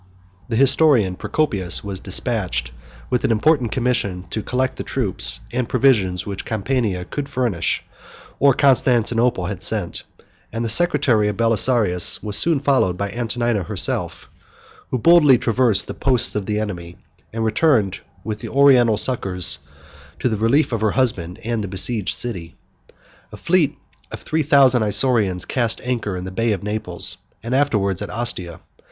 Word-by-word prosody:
The 115 - -2
historian 130 - +3
Procopius 95 - -1
was 100 -2 -5
despatched 95 - -2 0.4
with 125 - 0
an - - +1
important 120 +2 +2
commission 105 -8 -1
to 110 - -3
collect 130 +4 -2
the - - -4
troops 115 -9 +1
and 125 -1 -2
provisions 105 -9 +2
which 100 -2 -6
Campania 110 -4 -2
could 145 -1 -5
furnish, 120 - -1 0.6
or 140 -2 +4
Constantinople 120 -5 +2
had 95 0 -5
sent; - - -1 0.5
and 115 +2 -3
the - - -2
secretary 130 -6 +3
of 105 - -3
Belisarius 115 -5 +2
was 105 -2 -2
soon 160 +7 +2
followed 135 -10 +1
by 100 +1 -3
Antonina 120 -2 -2
herself, 85 - -2
93 - - -31 0.4
who 130 - -1
boldly 150 -1 +5
traversed 115 -4 +1
the - - -7
posts 130 -4 0
of 105 -2 -4
the 105 -1 -1
enemy, 90 -5 -6 0.3
and 115 0 -3
returned 110 - +1 0.2
with 105 0 -5
the - - -7
Oriental 130 -6 +4
succors 90 - 0 0.6
to - - -1
the 110 - 0
relief 120 +9 +2
of 115 -2 -2
her 110 - +2
husband 100 -8 -1
and 115 -1 -2
the - - -4
besieged 100 0 -2
city. 90 -9 -5 0.8
A - - -10
fleet 170 -5 +1 0.3
of - - -7
three 160 +1 -2
thousand 135 -4 +4
Isaurians 105 -3 +1
cast 120 -4 0
anchor 115 -6 -3
in 90 - -6
the 95 - -6
Bay 115 +3 0
of 95 - -5
Naples 105 -4 -2 0.3
and 115 +2 -4
afterwards 105 -10 0
at 105 - -5
Ostia. 105 -7 -4
115 Hz, 160 wpm, -20 LUFS, 100-130 Hz, 0.8 s, boldly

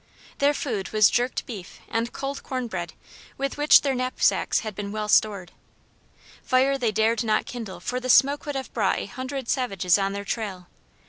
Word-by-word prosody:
Their 285 +1 +3
food 215 -11 -3
was 215 -1 +5
jerked 245 +1 0
beef 200 -7 -9
and 230 +1 -2
cold 275 0 -5
corn 255 -2 -4
bread, 175 -7 -5 0.4
with 275 0 -2
which 295 +1 +7
their 275 -2 0
knapsacks 255 0 +1
had 215 -2 -5
been 200 0 -5
well 215 0 -3
stored. 205 -3 +2 0.9
Fire 265 +1 +2
they 245 -5 0
dared 220 +2 +1
not 215 -1 +1
kindle 225 -6 -7
for 250 - -3
the 255 0 -5
smoke 280 +4 +4
would 290 - -3
have 265 -1 -5
brought 205 -5 +1
a - - -3
hundred 260 +3 -6
savages 195 -9 +1
on 195 0 0
their 200 0 -5
trail. 195 -5 -4
235 Hz, 185 wpm, -25 LUFS, 205-260 Hz, 0.9 s, which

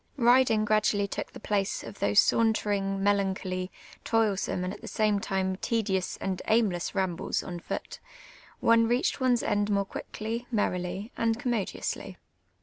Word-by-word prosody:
Riding 240 -3 +4
gradually 210 -1 +2
took - - -5
the - - -10
place 205 -2 -1
of 115 -3 -10
those 100 0 +4
sauntering, 205 -3 +2
melancholy, 190 -2 0 0.3
toilsome, 210 -5 +1
and 185 +1 -3
at - - -10
the - - -10
s;iine 210 -2 +1
lime 190 -1 0
tL'dious 195 -4 -1
and 190 -2 -3
aimless 210 -7 +1
rambles 190 -3 -1
on 175 -1 -6
foot; - - -6 0.6
one 230 0 +5
reached 245 +4 +1
one's 250 -2 +3
end 205 0 +1
more 200 -1 +1
quickly, 225 +4 -5
merrily, 195 -2 -2
and 225 -1 +1
eommodiouslv. 240 -6 -3
205 Hz, 145 wpm, -28 LUFS, 190-225 Hz, 0.6 s, one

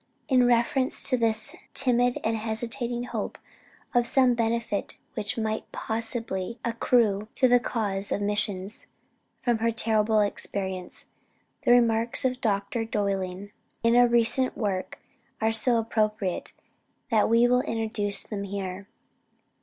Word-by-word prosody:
In 250 -2 +4
reference 245 +2 +2
to - - +5
this 220 -2 -1 0.2
timid 245 -1 +2
and 225 +1 +1
hesitating 235 +2 -1
hope 245 - -4 0.6
of 240 -1 +3
some 255 -2 +4
benefit 230 -3 -2 0.2
which 210 0 -3
might 220 -1 -3
possibly 225 -2 -3
accrue 225 -3 +2
to 255 - +4
the 245 0 +5
cause 205 -5 -2
of - - 0
missions, 205 0 -2 0.5
from 240 -2 0
her 230 +1 +2
terrible 220 -1 +2
experience, 190 -2 -3 0.6
the - - +5
remarks 235 0 +3
of 255 0 0
Dr. 215 +1 0
Dowling 200 -2 -2 0.3
in 230 +1 +4
a 245 0 +6
recent 240 +2 +1
work, 195 -4 -2 0.4
are 220 0 +2
so 230 +2 +3
appropriate, 215 -4 -1 0.6
that 220 -2 +3
we 230 +1 +5
will 250 +1 +3
introduce 220 -5 -1
them 205 -2 -5
here. 195 0 -5
225 Hz, 130 wpm, -26 LUFS, 205-240 Hz, 0.6 s, a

